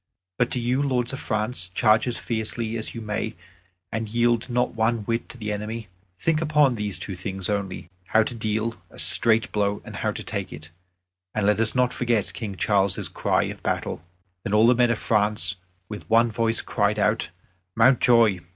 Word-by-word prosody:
But 125 - +2
do 125 - -1
you, 125 +3 0
lords 130 -3 0
of 135 - -4
France, 110 -3 -2
charge 110 +5 +3
as 120 - -2
fiercely 110 0 -3
as 110 +1 -5
you 115 - -5
may, 105 -1 -3 0.6
and 110 -1 -3
yield 120 +1 +1
not 125 +1 0
one 115 0 +1
whit 115 +2 -2
to - - -8
the 105 -2 -4
enemy. 105 +1 -5 0.3
Think 160 - +1
upon 150 -4 +3
these 105 -3 -1
two 95 - -5
things 95 +2 -4
only 100 -3 -3 0.2
how 110 +3 +3
to 115 - -4
deal 110 0 -1 0.2
a - - -16
straight 115 -1 +4
blow 105 -1 0
and - - -9
to - - -2
take - - -4
it. 75 +2 -10 0.6
And 105 -2 0
let 105 0 +3
us 115 +1 +1
not 125 0 +2
forget 115 -6 0
King 100 +2 -5
Charles' 100 -1 +1
cry - - +1
of - - -6
battle." - - -2 0.4
Then 100 - -1
all 110 +1 +6
the 120 - +6
men 120 0 +3
of 115 - +1
France 105 -2 +1 0.3
with 105 -1 -9
one 115 +1 +4
voice 115 +1 0
cried 105 0 0
out, 105 +2 +1 0.5
"Mountjoy!" 115 -4 +5
110 Hz, 190 wpm, -24 LUFS, 105-120 Hz, 0.6 s, all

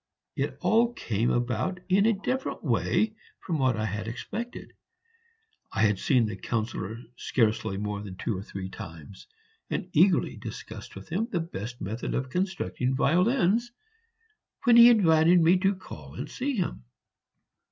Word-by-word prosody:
It - - -2
all 235 +2 +3
came 115 - -1
about 120 +9 -1
in 195 +3 +4
a - - +5
different 255 +7 -3
way 215 0 +1 0.3
from 165 -4 -3
what 130 -3 +2
I 110 - -1
had 110 +1 -4
expected; 225 - -6 1.0
I 110 - +1
had 105 -3 +3
seen 125 -4 +3
the 105 -2 -3
Councillor 110 0 -3 0.2
scarcely 110 -4 0
more 105 0 -3
than 100 -3 -8
two 105 +3 -2
or 95 - -4
three 95 -1 -6
times, 80 -1 -10 0.4
and 180 - -3
eagerly 175 +2 +3
discussed - - -8
with 95 - -10
him 205 +7 -1
the 175 - 0
best 120 - -6
method 110 +5 -3
of 130 0 -2
constructing 180 -8 -1
violins, 210 - +2 0.9
when 240 -2 +6
he 235 0 +10
invited 175 -5 +5
me 170 +3 +5
to 195 +1 +2
call 75 - -11
and - - -5
see 275 +1 -3
him. 180 - -2
135 Hz, 150 wpm, -27 LUFS, -, 1.0 s, he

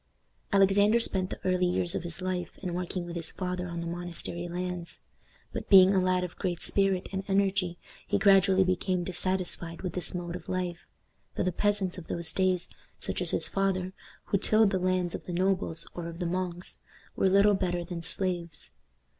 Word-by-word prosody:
Alexander 200 +3 +4
spent 190 -5 +1
the - - -6
early 185 -1 +2
years 175 -1 +3
of - - -1
his 175 +1 -3
life 185 -1 -3
in 180 -2 -3
working 180 0 -3
with 170 0 -7
his 165 -2 +4
father 180 -1 -3
on 170 -1 -5
the - - -5
monastery 175 0 -5
lands; 180 0 -4 0.5
but, - - -5
being 190 -1 +8
a 190 - +3
lad 185 0 +1
of 180 - -6
great 175 -3 -2
spirit 195 -2 +2
and 190 0 -3
energy, 195 -3 +1 0.3
he 205 - +1
gradually 195 -1 +5
became 185 0 0
dissatisfied 180 -2 -1
with 180 -3 -3
this 180 0 +1
mode 175 -1 -4
of - - -9
life; 180 -2 -3 0.5
for - - 0
the 185 - +1
peasants 195 -1 0
of 170 - -12
those 170 -1 -3
days, 185 -2 +1 0.3
such - - -3
as - - +2
his - - +1
father, 190 -1 -1 0.3
who 200 - 0
tilled 215 0 +4
the 190 - +1
lands 185 -1 0
of - - -6
the 180 - -5
nobles 180 -2 0
or 175 -1 -5
of 165 0 -7
the 180 - -3
monks, 180 0 -3 0.4
were 190 - +3
little 200 +2 +5
better 180 -3 -1
than 170 -1 -5
slaves. 170 -1 -3
185 Hz, 190 wpm, -29 LUFS, 175-190 Hz, 0.5 s, being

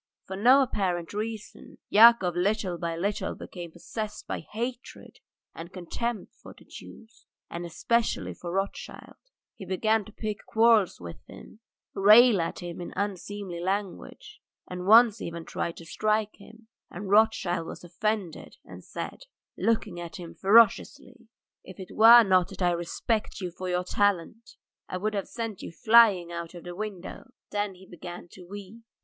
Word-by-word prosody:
For 190 - -6
no 250 +7 +5
apparent 180 -8 -2
reason 215 0 -7
Yakov 215 -5 +6
little 185 -1 -1
by 170 -1 -3
little 200 +4 -2
became 175 -2 -9
possessed 210 +5 -7
by - - -4
hatred 240 +3 -7 0.3
and 170 +2 -9
contempt 210 +5 -5
for - - -13
the - - -18
Jews, 225 0 -14 0.2
and 170 0 -5
especially 230 +8 -1
for 175 - -8
Rothschild; 195 +2 -5 0.4
he - - -9
began 215 +4 0
to 215 - -13
pick 215 -1 -5
quarrels 225 -4 +3
with 85 -1 -10
him, - - -13 0.3
rail 210 +1 +6
at 165 - -4
him 175 0 -7
in 175 - -7
unseemly 200 -2 -4
language 190 +1 -5 0.3
and 180 0 -6
once 225 0 +6
even 170 -1 -6
tried 170 - -4
to 165 - -11
strike 215 +4 -1
him, 220 +2 -17 0.2
and 195 +2 -7
Rothschild 200 -6 +2
was - - -9
offended 185 0 -4
and - - -12
said, - - -7 0.3
looking 220 -5 -1
at 170 +2 -8
him 175 -4 -9
ferociously: 235 +4 +2 0.4
"If 185 +1 -13
it 185 - -10
were 230 +2 +9
not 185 -4 +3
that - - -6
I 175 - +3
respect 175 +7 -2
you 180 -3 -4
for 185 +2 -6
your 180 0 0
talent, 205 +3 -1 0.3
I 185 - -3
would 215 +3 -2
have 200 -2 -3
sent 225 -4 -6
you - - -7
flying 215 -4 +4
out 170 0 -7
of 175 - -10
the 175 - -7
window." 210 +5 -7 0.2
Then 205 -2 -2
he 185 +1 -16
began 175 0 -10
to 185 - -13
weep. 205 +3 -10
200 Hz, 160 wpm, -27 LUFS, 175-220 Hz, 0.4 s, were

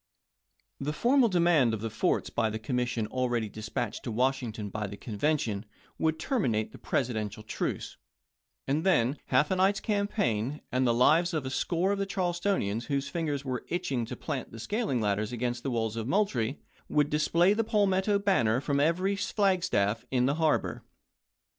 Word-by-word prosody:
The 145 +2 -2
formal 245 - +4
demand 170 - +3
of 105 - -7
the 115 -1 -3
forts 110 - 0
by 110 -2 +1
the 110 - -3
commission 120 0 -1
already 120 -1 -1
dispatched 110 +1 -4
to 120 - -3
Washington 120 -3 -1
by 105 +1 -3
the 100 +1 -8
Conven 140 +8 0
tion 105 -5 -3 0.4
would 160 0 +1
terminate 125 - 0
the - - -12
Presidential 110 -4 -2
truce; - - -4 0.7
and 145 +4 +1
then 145 -8 +2
half 150 +3 +3
a 185 - +2
night's 195 +2 +3
campaign, 150 - -1
and 130 0 +2
the - - +4
lives 160 +8 +4
of 150 -4 -2
a 130 - -3
score 175 +7 0
of 200 - -1
the 195 - -1
Charlestonians 175 - -1
whose 140 -1 -1
fingers 150 -5 -2
were 130 -2 -3
itching 140 -10 -2
to - - -5
plant 115 - -5
scaling 205 - -1
ladders 105 +1 0
against 120 0 -2
the 135 - -2
walls 115 -3 -1
of 115 0 -3
Moultrie, 140 - +1 0.3
would 150 -1 +2
display 170 +5 +3
the 225 +2 +1
palmetto 200 -1 +2
banner 130 - +2
from 140 0 0
every 180 +7 +2
flag 195 -2 +1
staff 105 - +1
in 125 -1 +2
the 140 - +2
harbor. 155 -2 +1
135 Hz, 170 wpm, -29 LUFS, 115-180 Hz, 0.7 s, formal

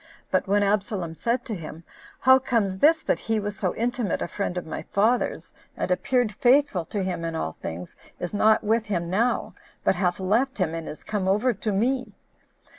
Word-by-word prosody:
But 185 - +1
when 205 +1 +3
Absalom 200 -4 0
said 235 +8 -1
to 225 - -4
him, 165 -3 -7 0.4
"How 260 +1 +7
comes 215 -7 0
this, 315 +5 +5
that - - +1
he 225 - -1
who 215 - -1
was 205 0 -3
so 185 -2 -2
intimate 235 -4 -1
a - - -3
friend 185 -1 -3
of 180 - -3
my 160 - -5
father's, 225 +5 0 0.2
and - - -2
appeared 245 +5 +1
faithful 245 - +3
to 200 +4 -3
him 180 -2 -3
in 165 -1 -3
all 80 - -2
things, 85 +2 -7 0.2
is 175 +2 -4
not 215 +2 +4
with 225 +1 +1
him 175 -4 -2
now, 230 +6 +1 0.3
but - - +4
hath 180 -1 0
left 230 +8 +1
him, 180 -5 0
and 165 -1 -5
is 155 - -9
come 205 -3 -2
over 210 +6 +2
to 210 +1 -3
me?" 250 +6 0
205 Hz, 200 wpm, -25 LUFS, 180-235 Hz, 0.4 s, How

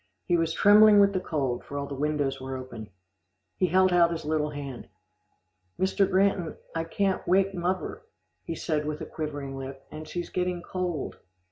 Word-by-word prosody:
He 175 - +2
was 165 -1 +1
trembling 205 +4 +7
with 200 0 +5
the 185 - +1
cold, 135 -8 -2
for 145 - -7
all 140 - -2
the 140 - -7
windows 140 -1 -1
were 130 0 -4
open. 120 -4 -8 0.7
He 185 - +2
held 185 +1 +4
out 170 -1 +5
his 165 -2 -4
little 150 -1 0
hand. 140 -4 -7 0.9
"Mr. 190 +1 +2
Granton, 190 -3 +1 0.2
I 165 0 -2
can't 195 +3 -1
wake 195 +2 +3
muvver," 180 +1 -2 0.4
he 165 - -4
said 155 -2 -1
with 150 0 -4
quivering 145 -3 -5
lip, 135 0 -8
"and 155 0 -8
she's 175 -1 -5
getting 180 -1 -1
cold." 180 -6 -3
165 Hz, 170 wpm, -27 LUFS, 145-185 Hz, 0.9 s, trembling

